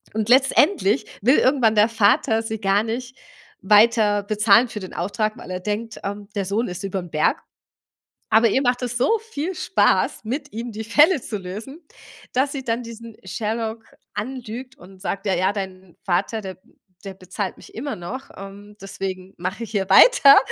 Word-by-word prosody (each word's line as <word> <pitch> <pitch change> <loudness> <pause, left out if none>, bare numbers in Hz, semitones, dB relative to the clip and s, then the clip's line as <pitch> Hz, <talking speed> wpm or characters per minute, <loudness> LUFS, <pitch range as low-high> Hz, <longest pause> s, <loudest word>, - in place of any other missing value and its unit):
und 220 +1 -1
letztendlich 265 - +3 0.2
will 255 +8 +4
irgendwann 255 -5 +3
der 210 +1 +5
Vater 225 0 +2
sie 220 -1 -5
gar 195 +1 +2
nicht 245 +3 -5 0.5
weiter 210 0 +4
bezahlen 215 +3 +4
für 210 - -7
den 185 - -9
Auftrag, 215 +4 -2
weil - - -10
er 180 - -3
denkt, 215 +3 -4
ähm, 200 0 -5
der 200 - 0
Sohn 215 +5 -1
ist 180 +1 -6
überm 185 -3 -4
Berg. 155 - +1 0.9
Aber 225 +1 +5
ihr 265 +6 +1
macht 245 0 +1
es 245 -1 -3
so 440 - +2
viel 335 +4 -3
Spaß 360 - +1
mit 275 +5 -4
ihm 230 +1 -5
die 220 +1 -6
Fälle 295 - +4
zu 215 - -5
lösen, 215 - -8 0.5
dass 270 +3 +1
sie 270 -2 -5
dann 230 +1 -1
diesen 230 -1 -10
Sherlock 220 +3 -4 0.3
anlügt 250 +2 -6
und 190 +1 -15
sagt: 200 +1 -4
„Ja, 190 - +2
ja 185 +3 +1
dein 190 -3 -7
Vater, 200 +4 -1
der 190 -2 -8 0.5
der 195 - -6
bezahlt 185 +1 -5
mich - - -15
immer 275 +5 -4
noch, 180 +10 -7
ähm, 200 +1 -11
deswegen 190 -1 -6
mache 185 +6 -4
ich - - -11
hier 195 -3 -1
weiter“ 280 - +8
215 Hz, 175 wpm, -22 LUFS, 195-245 Hz, 0.9 s, weiter